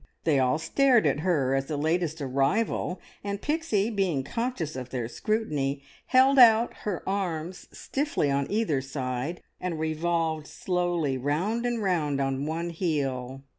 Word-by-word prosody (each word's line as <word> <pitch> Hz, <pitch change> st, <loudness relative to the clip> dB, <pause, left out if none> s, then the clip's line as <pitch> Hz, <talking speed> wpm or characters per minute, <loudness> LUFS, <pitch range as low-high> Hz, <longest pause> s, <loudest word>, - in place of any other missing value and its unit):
They 150 Hz, -4 st, +3 dB
all 130 Hz, +3 st, +2 dB
stared 240 Hz, -, +3 dB
at 145 Hz, 0 st, +2 dB
her 150 Hz, -6 st, +1 dB
as 135 Hz, 0 st, 0 dB
the 150 Hz, -, -2 dB
latest 160 Hz, +1 st, 0 dB
arrival, 140 Hz, -, 0 dB, 0.2 s
and 200 Hz, 0 st, -3 dB
Pixie, 235 Hz, -8 st, 0 dB
being 185 Hz, -10 st, 0 dB
conscious 230 Hz, -, -3 dB
of 130 Hz, -1 st, -6 dB
their 125 Hz, -3 st, -3 dB
scrutiny, 145 Hz, -, -1 dB, 0.2 s
held 265 Hz, +1 st, +5 dB
out 230 Hz, -1 st, +7 dB
her 200 Hz, -5 st, -4 dB
arms 180 Hz, -3 st, -3 dB
stiffly 275 Hz, -, -1 dB
on 140 Hz, 0 st, 0 dB
either 205 Hz, -11 st, +1 dB
side, 135 Hz, +4 st, -4 dB, 0.2 s
and 180 Hz, -3 st, -3 dB
revolved 160 Hz, 0 st, -1 dB
slowly 175 Hz, -7 st, -1 dB
round 185 Hz, -, 0 dB
and 235 Hz, -3 st, -1 dB
round 155 Hz, -7 st, 0 dB
on 135 Hz, +1 st, -1 dB
one 165 Hz, +2 st, -2 dB
heel. 135 Hz, -6 st, -2 dB
160 Hz, 145 wpm, -27 LUFS, 140-200 Hz, 0.2 s, out